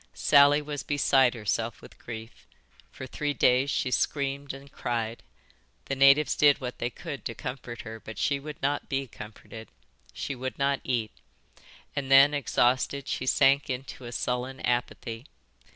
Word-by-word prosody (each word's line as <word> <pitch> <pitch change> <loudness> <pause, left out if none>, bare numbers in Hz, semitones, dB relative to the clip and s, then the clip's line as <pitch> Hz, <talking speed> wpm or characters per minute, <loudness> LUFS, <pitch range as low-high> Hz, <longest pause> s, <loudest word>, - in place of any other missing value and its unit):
"Sally 145 +1 +5
was 145 -2 -5
beside 135 -2 +3
herself 115 +1 -2
with - - -15
grief. 115 -1 -9 0.4
For 130 - -8
three 145 +3 -3
days 130 +2 +3
she 130 -3 -1
screamed 140 +1 -1
and 135 0 -11
cried. 115 -1 -3 0.6
The 135 - -2
natives 140 +2 +5
did 145 -1 +5
what 125 -3 -6
they 120 - -1
could 140 +3 -8
to 115 - -4
comfort 125 -3 -6
her, 110 0 -8
but 110 0 -10
she 140 -1 0
would 150 +1 -8
not 145 +1 -1
be 135 -1 -1
comforted. 110 -1 -11 0.4
She 140 - -4
would 130 0 -5
not 140 0 +1
eat. 115 -4 -1 0.8
And 140 -2 -3
then, 135 +2 +7
exhausted, 135 0 +1
she 130 - -3
sank 135 +2 +4
into 130 0 -5
a 120 - -7
sullen 125 +2 -3
apathy. 120 -1 -2
130 Hz, 155 wpm, -27 LUFS, 120-140 Hz, 0.8 s, then